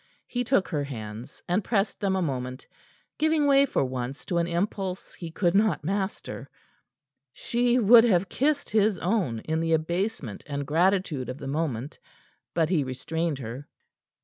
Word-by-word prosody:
He 245 0 -2
took 240 -6 +2
her 150 -4 -1
hands, 110 -4 -8
and 185 +4 +1
pressed 200 -2 0
them 195 -2 +1
a 190 - +1
moment, 130 -3 -4 0.5
giving 315 -1 +3
way 280 0 +5
for 140 - +1
once 130 +1 -5
to 175 - 0
an 170 - +1
impulse 185 +1 -3
he 170 - -7
could 170 +1 +1
not 205 -6 +2
master. 195 +4 -3 0.8
She 240 +6 +1
would 230 0 +8
have 190 -4 +3
kissed 285 +5 0
his 215 -2 +3
own 175 - 0
in 160 0 -1
the 165 0 +1
abasement 160 - -2
and 140 -1 -3
gratitude 165 -3 +1
of 130 - -5
the 140 - -8
moment. 140 -3 -3 0.6
But 165 -2 +2
he 165 -6 +2
restrained 155 +4 -2
her. 130 +3 -7
170 Hz, 160 wpm, -27 LUFS, 140-205 Hz, 0.8 s, would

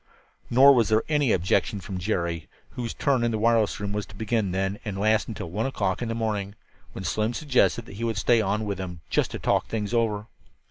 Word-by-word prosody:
Nor 135 +4 +7
was 115 -5 +3
there 110 +1 +3
any 145 -5 +2
objection 95 +3 +1
from 95 0 -6
Jerry, 85 -4 -2 0.2
whose 120 -3 -4
turn 135 -4 +1
in 120 - +2
the 110 - -1
wireless 115 -1 +2
room 100 0 -3
was 105 -3 -3
to 105 - -14
begin 110 -1 0
then 95 +2 -1
and 105 -3 -4
last 110 +2 +2
until 100 -7 -6
one 110 +7 -1
o'clock 100 -7 -1
in 120 - -2
the 115 - -2
morning, 105 -3 -2 0.4
when 95 - -6
Slim 110 +5 -1
suggested 130 -5 +2
that 100 - -11
he 115 - -4
would 115 -3 -1
stay 115 +2 +3
on 105 +1 -1
with 100 -2 -3
him, 90 -3 -6
"just - - +2
to - - -5
talk - - +1
things 110 0 -3
over." 110 -3 +1
110 Hz, 225 wpm, -26 LUFS, 100-115 Hz, 0.4 s, Nor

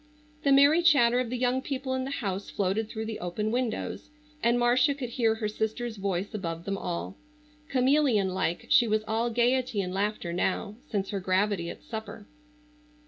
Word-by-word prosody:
The 280 - +2
merry 285 +5 +6
chatter 260 -8 +5
of 250 -2 -1
the 250 - -2
young 250 +1 +1
people 265 -1 -3
in 260 0 -1
the - - -4
house 200 -8 -3
floated 205 +3 -1
through 220 -1 -4
the 220 -1 -5
open 195 +5 -2
windows, 245 +3 -2 0.3
and 235 +1 +3
Marcia 245 +4 +3
could 260 -4 -5
hear 225 -2 +1
her 220 -1 -2
sister's 220 +2 -3
voice 195 -1 -2
above 170 -5 -4
them 195 - -1
all. 90 - -4 0.5
Chameleon 255 -6 +3
like 180 -2 -2
she 240 - +5
was 215 0 +1
all 225 +2 0
gaiety 245 0 +1
and 180 -2 -2
laughter 195 -3 -2
now, 190 +3 -1 0.2
since 200 -2 -2
her 200 - -2
gravity 185 -1 0
at - - -9
supper. 220 -1 -7
220 Hz, 180 wpm, -28 LUFS, 195-250 Hz, 0.5 s, merry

